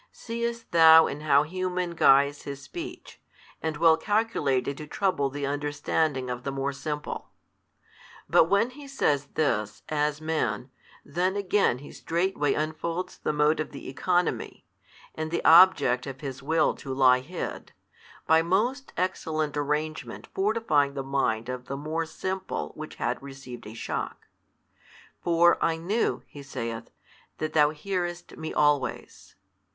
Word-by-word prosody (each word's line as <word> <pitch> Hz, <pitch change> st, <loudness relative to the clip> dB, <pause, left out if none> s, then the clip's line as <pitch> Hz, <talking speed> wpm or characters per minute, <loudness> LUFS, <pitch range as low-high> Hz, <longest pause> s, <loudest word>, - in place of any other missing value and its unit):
Seest 235 Hz, 0 st, -4 dB
thou 160 Hz, -1 st, +8 dB
in 145 Hz, -, -4 dB
how 145 Hz, -2 st, +4 dB
human 180 Hz, +1 st, -2 dB
guise 140 Hz, -3 st, +4 dB
His 140 Hz, -1 st, -7 dB
speech, 350 Hz, -, -9 dB, 0.4 s
and 160 Hz, -2 st, -2 dB
well 165 Hz, 0 st, +5 dB
calculated 160 Hz, -, 0 dB
to 150 Hz, -, -8 dB
trouble 165 Hz, -6 st, 0 dB
the 140 Hz, +1 st, -4 dB
understanding 145 Hz, -1 st, -1 dB
of 125 Hz, -1 st, -4 dB
the 140 Hz, -, -2 dB
more 135 Hz, +1 st, -2 dB
simple? 150 Hz, +1 st, -5 dB, 1.0 s
But -, -, +5 dB
when 200 Hz, +7 st, +2 dB
He 285 Hz, +2 st, -11 dB
says 145 Hz, -, 0 dB
this, 110 Hz, -9 st, 0 dB
as 150 Hz, -1 st, 0 dB
Man, 155 Hz, -5 st, -2 dB, 0.3 s
then 185 Hz, +2 st, 0 dB
again 200 Hz, -8 st, +2 dB
He 140 Hz, +3 st, -11 dB
straightway 170 Hz, -4 st, 0 dB
unfolds 160 Hz, +3 st, -3 dB
the -, -, -1 dB
mode 150 Hz, +1 st, +2 dB
of 155 Hz, -, -2 dB
the 140 Hz, -, -9 dB
economy, 175 Hz, +6 st, -1 dB, 0.5 s
and 155 Hz, 0 st, -4 dB
the 170 Hz, -, -2 dB
object 160 Hz, -8 st, +6 dB
of 135 Hz, -1 st, -7 dB
His 140 Hz, -2 st, -6 dB
will 155 Hz, +2 st, +2 dB
to 135 Hz, -, -7 dB
lie 130 Hz, -1 st, +5 dB
hid, 165 Hz, +8 st, -6 dB, 0.5 s
by 160 Hz, 0 st, +5 dB
most 225 Hz, +11 st, 0 dB
excellent 155 Hz, -5 st, -1 dB
arrangement 150 Hz, +2 st, -3 dB
fortifying 190 Hz, -9 st, +1 dB
the 135 Hz, -, -3 dB
mind 125 Hz, -4 st, 0 dB
of 125 Hz, 0 st, -5 dB
the 135 Hz, -, -4 dB
more 160 Hz, +3 st, -3 dB
simple 190 Hz, +3 st, -4 dB
which 155 Hz, 0 st, -8 dB
had -, -, -2 dB
received 135 Hz, -4 st, -10 dB
a 110 Hz, -, -9 dB
shock. -, -, -4 dB, 1.0 s
For 170 Hz, 0 st, +4 dB
I 165 Hz, -1 st, +2 dB
knew 195 Hz, +8 st, -1 dB
(He 145 Hz, -, -11 dB
saith) 115 Hz, -4 st, -5 dB, 0.5 s
that 155 Hz, -, -3 dB
Thou 150 Hz, -2 st, +5 dB
hearest 175 Hz, +2 st, -4 dB
Me 160 Hz, -, -5 dB
always. 145 Hz, -2 st, 0 dB
155 Hz, 145 wpm, -27 LUFS, 140-175 Hz, 1.0 s, thou